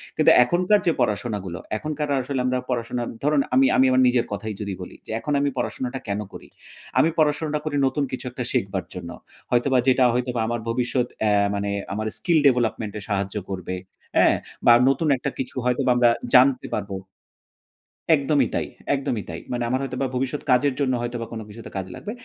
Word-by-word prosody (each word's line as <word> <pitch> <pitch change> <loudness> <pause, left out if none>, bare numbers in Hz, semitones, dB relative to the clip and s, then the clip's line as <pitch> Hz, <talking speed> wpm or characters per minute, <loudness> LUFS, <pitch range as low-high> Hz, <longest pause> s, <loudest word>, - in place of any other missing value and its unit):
কিন্তু - - +5
এখনকার 180 +8 +2
যে - - +6
পড়াশোনাগুলো 105 -5 -2 0.2
এখনকার 150 +2 -3
আসলে 135 0 -3
আমরা 130 0 +1
পড়াশোনা 120 0 -2 0.2
ধরুন 150 -1 +3
আমি 135 +1 +6
আমি 130 - +6
আমার 130 0 +4
নিজের 125 -1 +2
কথাই 105 +1 -4
যদি 100 -2 -3
বলি 90 - -9
যে - - -8
এখন 145 - -2
আমি 145 - +2
পড়াশোনাটা 130 +1 -3
কেনো 105 +1 -2
করি? - - -10 0.5
আমি 165 - +5
পড়াশোনাটা 150 0 +1
করি 150 - -2
নতুন 140 +2 -1
কিছু 130 - -5
একটা 125 - -4
শিখবার 95 -6 -1
জন্য। 90 -2 -7 0.4
হয়তোবা 130 +2 +3
যেটা 130 0 +5
হয়তোবা 125 -1 -1
আমার 120 0 -1
ভবিষ্যৎ 125 +1 0
অ্যা 105 -1 +3 0.2
মানে 100 0 -2 0.2
আমার 110 +1 -2
স্কিল 170 -3 +2
ডেভেলপমেন্ট 115 -5 +1
এ - - -10
সাহায্য 100 0 -1
করবে। 95 -1 -4 0.4
হ্যাঁ? - - +5 0.3
বা 120 - +9 0.2
নতুন 135 +4 +1
একটা 140 - -3
কিছু 130 - -4
হয়তোবা 125 0 +2
আমরা 120 -1 +5 0.3
জানতে 130 0 +5
পারবো। 100 -2 -4 1.2
একদমই 145 0 +2
তাই, - - -1 0.3
একদমই 120 -6 -2
তাই। 80 - -5
মানে 120 -1 -1
আমার 130 +2 +1
হয়তোবা 130 0 -2
ভবিষ্যৎ 135 +3 -2
কাজের 135 +2 +3
জন্য 130 -2 +1
হয়তোবা 120 -1 -3
কোনো 110 -1 -5
কিছুতে 115 +2 -10
কাজ 95 - -3
লাগবে। 210 - -6
125 Hz, 180 wpm, -23 LUFS, 110-135 Hz, 1.2 s, বা